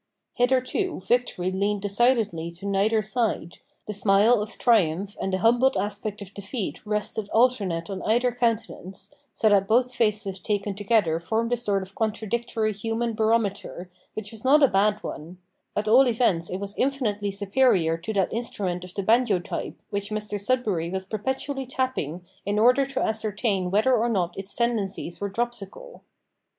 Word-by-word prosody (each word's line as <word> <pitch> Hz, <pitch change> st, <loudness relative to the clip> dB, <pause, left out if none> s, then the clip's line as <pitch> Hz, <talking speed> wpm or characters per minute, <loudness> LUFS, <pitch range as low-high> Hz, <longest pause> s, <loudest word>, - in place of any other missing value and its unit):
Hitherto 260 Hz, +9 st, +1 dB
victory 215 Hz, -6 st, 0 dB
leaned 200 Hz, +1 st, -1 dB
decidedly 210 Hz, -5 st, +2 dB
to 180 Hz, +4 st, -10 dB
neither 205 Hz, +2 st, +2 dB
side, 215 Hz, -6 st, -1 dB, 0.3 s
the 210 Hz, -, -4 dB
smile 205 Hz, +3 st, +4 dB
of 215 Hz, +2 st, -6 dB
triumph 200 Hz, -4 st, +2 dB
and 195 Hz, -, -1 dB
the 185 Hz, -, +1 dB
humbled 240 Hz, +4 st, +3 dB
aspect 205 Hz, +1 st, -2 dB
of 195 Hz, -, -14 dB
defeat 200 Hz, +2 st, -5 dB
rested 210 Hz, 0 st, -1 dB
alternate 205 Hz, -9 st, +2 dB
on 195 Hz, -2 st, -5 dB
either 240 Hz, +3 st, +2 dB
countenance, 230 Hz, -3 st, -3 dB, 0.2 s
so 220 Hz, -, +1 dB
that 195 Hz, -1 st, +3 dB
both 250 Hz, +3 st, +2 dB
faces 210 Hz, -5 st, 0 dB
taken 205 Hz, +1 st, -2 dB
together 200 Hz, -5 st, +1 dB
formed 225 Hz, +7 st, -1 dB
a -, -, +4 dB
sort 205 Hz, -5 st, 0 dB
of 190 Hz, +1 st, -12 dB
contradictory 220 Hz, 0 st, -1 dB
human 225 Hz, +3 st, -2 dB
barometer, 215 Hz, -5 st, -1 dB, 0.2 s
which 210 Hz, -1 st, -5 dB
was 225 Hz, -1 st, -9 dB
not 285 Hz, +3 st, +5 dB
a -, -, +8 dB
bad 210 Hz, 0 st, +1 dB
one 165 Hz, +4 st, -7 dB, 0.4 s
at 210 Hz, +1 st, -1 dB
all 255 Hz, +5 st, +6 dB
events 220 Hz, -8 st, +1 dB
it 185 Hz, -, -3 dB
was 200 Hz, +1 st, -4 dB
infinitely 225 Hz, -7 st, 0 dB
superior 195 Hz, -4 st, +2 dB
to 170 Hz, +6 st, -5 dB
that 195 Hz, -3 st, 0 dB
instrument 195 Hz, -6 st, -3 dB
of 180 Hz, 0 st, -11 dB
the 200 Hz, -, -2 dB
banjo 225 Hz, -1 st, +3 dB
type, 175 Hz, -, -5 dB
which 200 Hz, 0 st, -3 dB
Mr 210 Hz, -1 st, -3 dB
Sudberry 200 Hz, -7 st, 0 dB
was 190 Hz, 0 st, -3 dB
perpetually 265 Hz, +6 st, -3 dB
tapping 255 Hz, -, -3 dB, 0.2 s
in 205 Hz, +1 st, -1 dB
order 250 Hz, +5 st, +4 dB
to 275 Hz, -, -2 dB
ascertain 210 Hz, -3 st, -1 dB
whether 215 Hz, +7 st, +3 dB
or 240 Hz, 0 st, +2 dB
not 180 Hz, -6 st, 0 dB
its 195 Hz, +1 st, -8 dB
tendencies 210 Hz, -7 st, -2 dB
were 200 Hz, -, -1 dB
dropsical. 240 Hz, -, -5 dB
210 Hz, 160 wpm, -25 LUFS, 195-235 Hz, 0.4 s, a